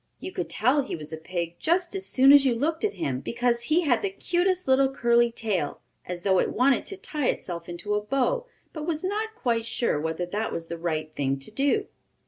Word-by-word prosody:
You - - -6
could - - -4
tell 255 +7 +3
he 270 - -4
was 155 -1 -6
a - - -1
pig 170 +1 -4
just 345 +1 +1
as 385 -1 -2
soon 270 +2 +6
as 285 -1 +8
you 255 -3 +2
looked 315 +7 -1
at 425 -1 0
him, 130 -2 -2
because 235 - 0
he 315 +5 +3
had 280 -8 +2
the 400 - 0
cutest 370 -1 0
little 265 0 +4
curly 240 -2 +3
tail, 200 -11 -2 0.3
as 175 -1 -5
though 190 -2 +3
it - - +1
wanted 255 +2 +2
to 395 - -3
tie 300 -7 -2
itself 170 -1 -3
into 180 +4 -4
a 210 - +1
bow, 275 - 0 0.3
but 310 -1 -5
was 315 -1 -1
not 430 +3 -2
quite 230 - -1
sure 225 -10 0
whether 160 +2 -2
that 210 +5 -3
was 165 0 -5
the 170 - -4
right 155 -2 -2
thing 135 -2 -1
to 135 +9 -8
do. 280 - +1
240 Hz, 225 wpm, -26 LUFS, -, 0.3 s, as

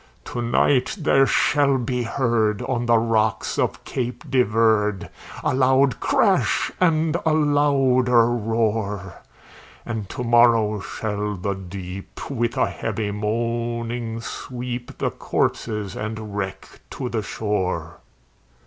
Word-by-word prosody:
"To 120 - -4
night 125 +2 +2
there 135 -4 +4
shall 140 -1 +3
be 125 0 -2
heard 115 -4 0
on 120 -2 -2
the 120 -1 +5
rocks 110 -1 0
of - - -1
Cape 125 -1 -4
de 130 -2 +4
Verde, 105 -3 +2 0.3
A - - +1
loud 130 -1 +3
crash, - - +2
and 160 -2 +3
a 160 - +2
louder 135 -5 +3
roar; 110 -4 -1 0.6
And 110 -5 -4
to 125 - -4
morrow 115 -3 +4
shall 105 0 -3
the 100 +2 -2
deep, 95 +3 -8
with 120 -3 -1
a - - +3
heavy 105 -2 -3
moaning, 115 +2 -2
sweep 125 0 -6
The - - -1
corpses 105 -4 -2
and 110 -1 -5
wreck 95 -1 -4 0.2
to 130 - -5
the 115 -2 -2
shore." 95 -6 -2
115 Hz, 120 wpm, -23 LUFS, 105-125 Hz, 0.6 s, the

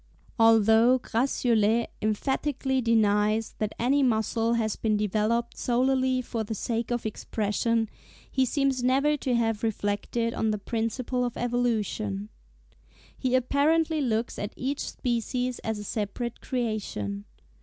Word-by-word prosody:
Although 225 +2 +6
Gratiolet 235 -3 +1
emphatically 265 +4 0
denies 215 -1 +2
that 215 -1 -1
any 270 +4 +2
muscle 230 -2 +1
has 220 -2 0
been 215 -2 0
developed 215 +3 0
solely 255 +1 +1
for 230 -2 -3
the 220 +1 -4
sake 230 +2 -2
of 240 -1 -2
expression, 220 +1 -1 0.4
he 265 - +2
seems 270 0 +1
never 275 +4 +3
to 255 -3 -1
have 225 -2 0
reflected 225 +2 -1
on 220 - 0
the 215 - 0
principle 230 +4 -2
of 245 -1 -3
evolution. 215 - -1 0.9
He 255 -1 0
apparently 305 +5 +2
looks 230 -3 -1
at 205 +1 -4
each 275 +2 -3
species 245 0 -2
as 220 -1 -3
a 210 - -6
separate 220 +3 -4
creation. 205 - -3
230 Hz, 125 wpm, -27 LUFS, 215-255 Hz, 0.9 s, Although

